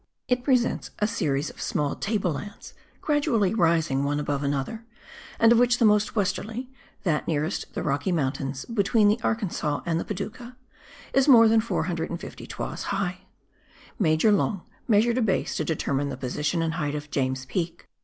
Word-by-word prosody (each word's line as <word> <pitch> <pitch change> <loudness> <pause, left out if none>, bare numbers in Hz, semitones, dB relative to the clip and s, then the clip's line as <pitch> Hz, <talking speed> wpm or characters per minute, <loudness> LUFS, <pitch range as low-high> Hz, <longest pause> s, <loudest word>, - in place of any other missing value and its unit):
It 250 0 +1
presents 250 -3 +1
a 210 - +1
series 155 -10 -1
of - - -12
small 145 -1 -1
table 200 -4 -1
lands, 205 +7 -8 0.3
gradually 285 - +1
rising 165 -8 +2
one 145 +1 0
above 145 -1 -2
another, 140 +10 -2 0.5
and 230 0 +5
of 235 - +6
which 245 0 +4
the 235 - +3
most 210 +2 +3
westerly 220 +5 -2 0.3
(that 160 -6 0
nearest 155 +3 -2
the - - -2
Rocky 145 +5 0
Mountains, 135 -4 -2
between 215 -1 +3
the 215 +3 +2
Arkansas 190 -10 -1
and 165 -1 0
the - - -2
Padouca), 220 +5 -6 0.6
is 270 +1 +3
more 230 -5 +8
than 220 0 +4
450 170 -6 -3
toises - - -5
high. 190 -2 -3 0.7
Major 160 +2 +3
Long 200 -2 +1 0.2
measured 230 +2 +3
a - - +1
base 210 -4 0
to - - 0
determine 145 -3 -1
the - - -5
position 150 +6 -1
and 165 0 -1
height 150 -3 -2
of 150 0 -6
James 130 -1 -1
Peak. 170 +4 -4
185 Hz, 165 wpm, -26 LUFS, 150-225 Hz, 0.7 s, more